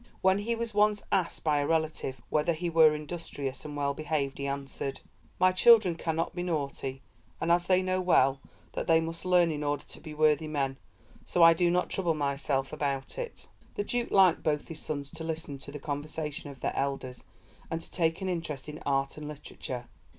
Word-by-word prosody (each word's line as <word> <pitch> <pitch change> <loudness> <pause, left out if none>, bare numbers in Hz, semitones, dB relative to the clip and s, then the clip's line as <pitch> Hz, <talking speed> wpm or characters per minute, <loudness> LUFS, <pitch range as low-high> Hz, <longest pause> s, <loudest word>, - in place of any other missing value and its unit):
When 190 +1 +4
he 230 +3 -1
was 230 -1 -4
once 210 0 +3
asked 180 -3 0
by 150 -2 +2
a 145 - 0
relative 155 -5 -1
whether 155 +2 +1
we 175 -1 -1
were 160 -2 +6
industrious 150 -3 -5
and 145 -1 -6
well 140 -1 0
behaved, 145 -2 -2
he 140 - -2
answered: 140 0 -4 0.4
'My 185 0 +5
children 205 -1 +6
cannot 165 +1 -2
be 175 - -3
naughty, 140 -5 -3 0.4
and 170 - +1
as 175 0 +3
they 185 0 +4
know 185 0 0
well 135 -7 +3 0.3
that - - -3
they 165 -1 +6
must 165 +2 -5
learn 180 -2 +4
in 150 -1 -3
order 145 -1 -1
to - - -13
be 155 -1 -8
worthy 155 0 +3
men, 135 -3 -2 0.4
so 175 - +2
I 165 0 +9
do 175 +1 +2
not 180 +1 +1
trouble 175 -4 +1
myself 140 -1 -1
about 140 - -2
it.'" 480 -2 -6 0.3
The 205 - -1
Duke 240 +3 -1
liked 190 -4 +5
both 150 -2 -1
his 160 -2 -6
sons 145 -2 -4
to 160 -1 -7
listen 160 -3 -4
to 140 - -9
the 145 - -6
conversation 145 +1 -4
of 135 -3 -12
their - - -1
elders 135 -2 -3 0.5
and 165 - -2
to - - -11
take 165 +1 0
an - - -1
interest 165 -6 -3
in 150 0 -7
art 135 0 0
and 150 -1 -6
literature. 135 -4 -6
155 Hz, 200 wpm, -29 LUFS, 140-175 Hz, 0.5 s, I